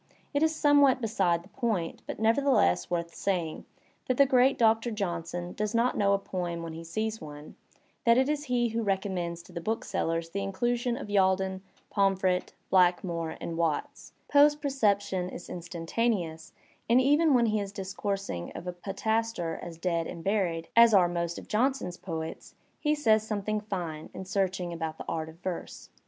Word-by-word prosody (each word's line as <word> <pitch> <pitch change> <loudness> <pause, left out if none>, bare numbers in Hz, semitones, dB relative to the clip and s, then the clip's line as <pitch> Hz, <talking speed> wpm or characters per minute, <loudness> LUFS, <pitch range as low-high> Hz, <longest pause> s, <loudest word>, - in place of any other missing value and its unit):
It 285 - +1
is 320 0 +3
somewhat 285 -3 +5
beside 190 -7 +1
the 190 - -18
poiat, 215 -11 -2
but - - -5
nevertheless 225 - +3
worth 170 -1 -2
saying, 175 -5 -2 0.4
that 255 - +1
the 280 - +7
great 260 0 +4
Doctor 225 +1 +3
Johnson 175 -4 -3
does 210 +2 -2
not 235 +2 +2
know 200 -1 +3
a - - +4
poem 175 -3 -4
when 165 -1 -6
he 165 +1 -7
sees 215 +6 -3
one, 150 -1 -10 0.5
that 235 0 +5
it 260 +1 +3
is 295 0 -1
he 245 -2 +1
who 230 +1 -1
recommends 190 -4 -2
to - - -16
the 170 - -4
booksellers 165 -5 -2
the 200 - -2
inclusion 240 +5 -1
of 240 - -7
Yalden, 190 -1 +2 0.3
Pomfret, 190 -2 +1 0.2
Blackmore 175 -3 +2
and 165 -1 -5
Watts; 165 -3 -2
Poe's 290 +1 +6
perception 205 -10 0
is 180 - -9
instantaneous, 170 -1 -2 0.4
and 240 +2 +6
even 290 +3 +4
when 240 -1 +4
he 215 -1 +1
is 200 -1 -4
discoursing 195 - -4
of 170 - -7
a 180 - -3
poetaster 195 -1 -2
as 170 -2 -8
dead 170 -1 -1
and 165 - -7
buried, 185 -5 0
as 230 -2 +7
are 180 -3 +6
most 170 -1 -2
of - - -9
Johnson's 225 -6 0
poets," 160 -2 -6 0.2
he 300 0 +1
says 220 -7 +3
something 215 0 -2
fine 175 -7 -5
and 190 - -7
searching 185 -2 -1
about 160 -1 -4
the - - -8
art 160 -1 -3
of 160 - -12
verse. 185 -2 -6
195 Hz, 175 wpm, -29 LUFS, 170-230 Hz, 0.5 s, the